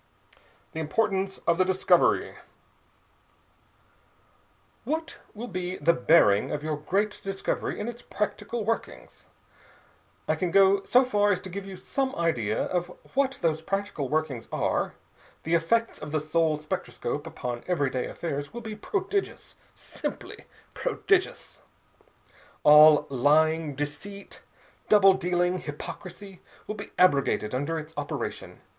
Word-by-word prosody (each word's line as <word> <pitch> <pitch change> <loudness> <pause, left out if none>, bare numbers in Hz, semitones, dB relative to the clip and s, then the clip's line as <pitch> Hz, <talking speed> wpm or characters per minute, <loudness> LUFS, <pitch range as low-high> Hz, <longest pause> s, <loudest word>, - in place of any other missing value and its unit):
THE 160 - -6
IMPORTANCE 195 +4 -1
OF 170 +1 +2
THE - - +6
DISCOVERY 185 0 +2 2.5
"What 320 +2 -3 0.2
will 235 +4 -6
be 185 -2 -4
the 165 +3 +3
bearing 125 -7 +4
of 150 0 -3
your 155 -1 -1
great 195 +8 -1
discovery 195 0 -3
in 210 - -3
its 240 0 -6
practical 210 +2 -3
workings?" 225 +1 -4 1.0
"I - - +3
can 180 - -1
go 195 +1 +5
so 255 +1 +5
far 205 -4 +2
as 185 - +1
to 185 - -8
give 195 +2 -6
you 195 - -7
some 265 +7 -2
idea 120 -11 0
of 175 -1 -1 0.3
what 270 -1 +1
those 160 -1 +1
practical 195 -6 -3
workings 150 -6 -2
are. - - -1 0.5
The 165 - -2
effect 225 +8 +1
of 150 - -6
the 155 - +1
soul 155 0 +1
spectroscope 155 0 -4
upon 120 -1 -5
everyday 140 -8 0
affairs 145 -4 -4
will 240 - -5
be 220 -2 -6
prodigious, 390 - -3 0.2
simply - - -7 0.3
prodigious. 405 -6 -1 1.0
All 150 0 +8
lying, 150 +3 +2
deceit, 195 +8 -6 0.5
double 195 -2 +7
dealing, 180 -1 0
hypocrisy, 185 +5 -8 0.2
will - - -4
be 205 -1 -8
abrogated 140 -10 +3
under 145 +6 -1
its 155 0 -7
operation. 145 -1 -5
175 Hz, 125 wpm, -27 LUFS, 150-205 Hz, 2.5 s, All